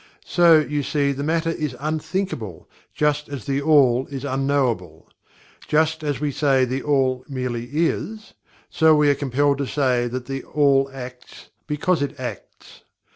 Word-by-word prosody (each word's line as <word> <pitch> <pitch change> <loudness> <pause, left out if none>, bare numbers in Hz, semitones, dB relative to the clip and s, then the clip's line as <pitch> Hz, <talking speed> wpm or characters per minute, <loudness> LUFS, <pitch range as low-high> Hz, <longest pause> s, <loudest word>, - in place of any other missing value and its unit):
So, 170 -2 +5
you 150 -1 0
see, 140 +1 0
the 140 0 -4
matter 165 +2 0
is 150 -6 -3
Unthinkable, 155 - -3 0.2
just 150 0 0
as 140 -2 -7
THE 140 -1 -1
ALL 135 -4 +4
is 140 -1 -6
Unknowable. 130 - -1 0.6
Just 155 +1 +1
as 145 -4 -2
we 150 0 -1
say 135 -2 +2
THE 130 +2 -3
ALL 130 -3 +1
merely 125 -3 -3
"IS" 190 +7 -2 0.3
so 160 -1 +4
we 150 -1 +4
are - - +4
compelled 140 +1 0
to 140 - -2
say 125 -4 +1
that 125 +1 -5
"THE 135 0 -4
ALL 140 -2 +2
ACTS 125 -1 -10 0.2
BECAUSE 150 +2 0
IT 145 - -3
ACTS." - - -9
140 Hz, 155 wpm, -22 LUFS, 130-150 Hz, 0.6 s, So